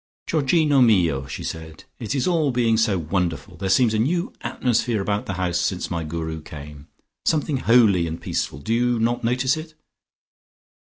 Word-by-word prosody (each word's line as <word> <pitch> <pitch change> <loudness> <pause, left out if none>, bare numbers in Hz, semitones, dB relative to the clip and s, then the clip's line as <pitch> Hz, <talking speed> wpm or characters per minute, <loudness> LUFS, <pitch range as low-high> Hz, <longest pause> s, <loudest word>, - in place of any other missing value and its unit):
"Georgino 150 -2 +2
mio!" 85 - +3
she - - -6
said. 80 -1 -7 0.2
"It 115 +3 -3
is 135 - 0
all 165 -5 +2
being 120 -3 +2
so 110 -3 +2
wonderful. 85 0 -2
There 95 +3 -3
seems 115 +2 +4
a 110 - +1
new 170 +10 0
atmosphere 120 -2 0
about 100 +1 -2
the 95 - -2
house 90 -2 -1
since 90 0 -2
my 85 -2 -2
Guru 80 0 -4
came. 75 -1 -10 0.4
Something 150 -2 +1
holy 110 -9 +4
and 80 +1 -5
peaceful; - - -3
do 70 +11 -3
you 120 +1 +2
not 120 +2 0
notice 130 +3 +1
it?" 155 0 -9
110 Hz, 170 wpm, -23 LUFS, 85-125 Hz, 0.4 s, seems